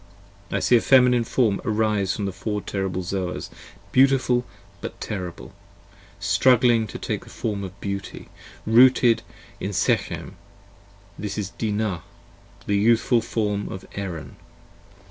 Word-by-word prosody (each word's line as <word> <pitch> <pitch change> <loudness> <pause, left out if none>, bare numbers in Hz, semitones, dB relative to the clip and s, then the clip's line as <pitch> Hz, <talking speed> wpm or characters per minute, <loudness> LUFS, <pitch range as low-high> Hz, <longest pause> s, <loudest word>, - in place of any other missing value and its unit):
I - - 0
see 125 - +4
a 115 - +5
Feminine 125 -2 +5
Form 115 -3 +1
arise 105 -4 +1
from 105 - -3
the 95 - -2
Four 105 +3 -3
terrible 95 -2 -3
Zoas, 90 0 -4 0.4
Beautiful 130 -1 +3 0.3
but - - -7
terrible, 90 -5 -6 0.7
struggling 120 -3 +4
to - - -7
take - - -4
a - - -11
form 105 -3 -3
of 95 +1 -8
beauty, 100 -1 -6 0.4
Rooted 120 +1 +5 0.4
in 100 - -4
Shechem: 85 - -1 0.8
this 105 0 -4
is 100 -2 -3
Dinah, 105 -5 -2 0.6
the 100 - +1
youthful 115 +3 +3
form 105 -3 -2
of 95 - -7
Erin. 90 -6 -6
105 Hz, 125 wpm, -24 LUFS, 100-120 Hz, 0.8 s, a